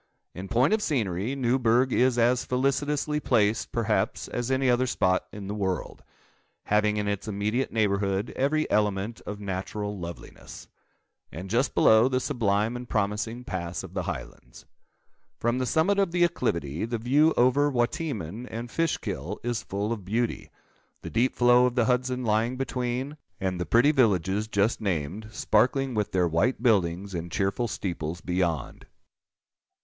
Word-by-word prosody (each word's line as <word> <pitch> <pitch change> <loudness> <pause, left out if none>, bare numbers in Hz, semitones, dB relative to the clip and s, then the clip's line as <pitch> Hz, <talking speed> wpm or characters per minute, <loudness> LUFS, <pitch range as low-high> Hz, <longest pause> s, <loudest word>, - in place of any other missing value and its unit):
In 95 +2 -7
point 125 - +3
of 220 - +2
scenery, 110 - -1
Newburgh 125 -1 +2
is 125 0 +3
as 120 +2 +3
felicitously 145 +3 0
placed, 110 -5 +1
perhaps, - - 0
as 120 0 -3
any 130 0 +1
other 125 +1 +3
spot 95 -6 +1
in 100 -1 -8
the 100 - -4
world, 95 -3 -3 0.6
having 105 0 +2
in 105 -1 -1
its 100 0 -3
immediate 105 +5 -1
neighbourhood 100 -1 0
every 155 +3 +1
element 105 +1 0
of 105 0 -5
natural 105 +1 -4
loveliness; 85 -1 -9 0.6
and, 90 +4 -7
just 125 +4 +1
below, 110 +2 +6
the 130 -1 +1
sublime 115 -4 0
and 125 0 -7
promising 105 +3 -1
Pass 85 -6 -4
of - - -10
the - - -1
Highlands. 60 - -8 0.7
From 120 +2 0
the 130 - -1
summit 185 - +2
of 195 -4 +2
the 175 0 +2
acclivity, 85 - -1
the 115 +1 -2
view 145 +8 +3
over 135 +4 +4
Wateaman 120 - -2
and 120 +1 -6
Fishkill 105 - -2
is 120 -1 -1
full 100 +3 -2
of 105 -4 -7
beauty; 115 +5 -2 0.5
the - - -6
deep 120 +3 +1
flow 125 0 +5
of 125 - -4
the 120 -3 +3
Hudson 125 +1 0
lying 115 +3 +1
between, 130 +2 -3 0.2
and 95 -2 -2
the - - -3
pretty 120 +6 +5
villages 105 - +2
just 105 +2 +1
named, 95 +2 -2
sparkling 130 +5 +1
with 105 -2 -1
their 90 -3 +2
white 100 +11 0
buildings 95 -4 +1
and 85 -1 -5
cheerful 100 +7 0
steeples, 85 -5 -4
beyond. 90 -7 -2
115 Hz, 155 wpm, -27 LUFS, 100-125 Hz, 0.7 s, below